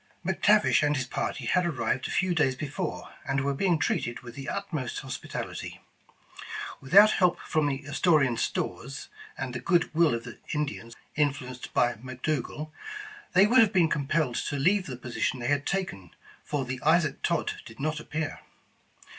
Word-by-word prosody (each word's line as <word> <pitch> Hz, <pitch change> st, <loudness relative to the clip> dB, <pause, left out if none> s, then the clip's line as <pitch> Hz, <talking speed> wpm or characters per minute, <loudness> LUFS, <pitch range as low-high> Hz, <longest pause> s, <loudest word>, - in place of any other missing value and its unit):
McTavish 205 Hz, +3 st, +4 dB
and 145 Hz, 0 st, +2 dB
his 135 Hz, -, -1 dB
party 130 Hz, -, -3 dB
had 180 Hz, +9 st, +3 dB
arrived 130 Hz, -6 st, -1 dB
a -, -, -8 dB
few 185 Hz, -2 st, +1 dB
days 145 Hz, -6 st, +2 dB
be 150 Hz, -, -4 dB
fore, 170 Hz, +4 st, -4 dB
and 135 Hz, 0 st, 0 dB
were 140 Hz, +1 st, 0 dB
being 175 Hz, +4 st, +2 dB
treated 120 Hz, -5 st, -1 dB
with 120 Hz, -2 st, -10 dB
the 135 Hz, -1 st, -6 dB
utmost 155 Hz, -10 st, -3 dB
hospital 130 Hz, -1 st, -5 dB
ity. -, -, -7 dB, 1.0 s
Without 200 Hz, +10 st, +7 dB
help 180 Hz, -2 st, +3 dB
from 155 Hz, -2 st, +1 dB
the 140 Hz, 0 st, -2 dB
Astorian 145 Hz, -4 st, +3 dB
stores, 135 Hz, +3 st, -3 dB, 0.3 s
and 130 Hz, -2 st, -4 dB
the 120 Hz, -, -3 dB
good 170 Hz, +7 st, +2 dB
will 160 Hz, -5 st, +4 dB
of 115 Hz, -, -5 dB
the 120 Hz, -, -10 dB, 0.2 s
Indians 140 Hz, -6 st, -3 dB, 0.2 s
influenced 130 Hz, -4 st, -1 dB
by 120 Hz, 0 st, +4 dB
McDougal, 130 Hz, +5 st, -4 dB, 0.6 s
they 190 Hz, -, +7 dB
would 245 Hz, +5 st, +5 dB
have 220 Hz, -4 st, +6 dB
been 175 Hz, -5 st, +4 dB
compelled 145 Hz, -2 st, 0 dB
to -, -, -2 dB
leave 180 Hz, +7 st, +2 dB
the 130 Hz, -3 st, -5 dB
position 125 Hz, +1 st, -2 dB
they 120 Hz, +1 st, -2 dB
had 145 Hz, -1 st, +1 dB
taken, 180 Hz, -, -2 dB, 0.3 s
for 145 Hz, -3 st, -2 dB
the 130 Hz, 0 st, -4 dB
Isaac 155 Hz, -2 st, +3 dB
Todd 170 Hz, -2 st, 0 dB
did 115 Hz, -, -13 dB
not 155 Hz, +2 st, -1 dB
appear. 155 Hz, 0 st, -4 dB
145 Hz, 170 wpm, -28 LUFS, 130-170 Hz, 1.0 s, Without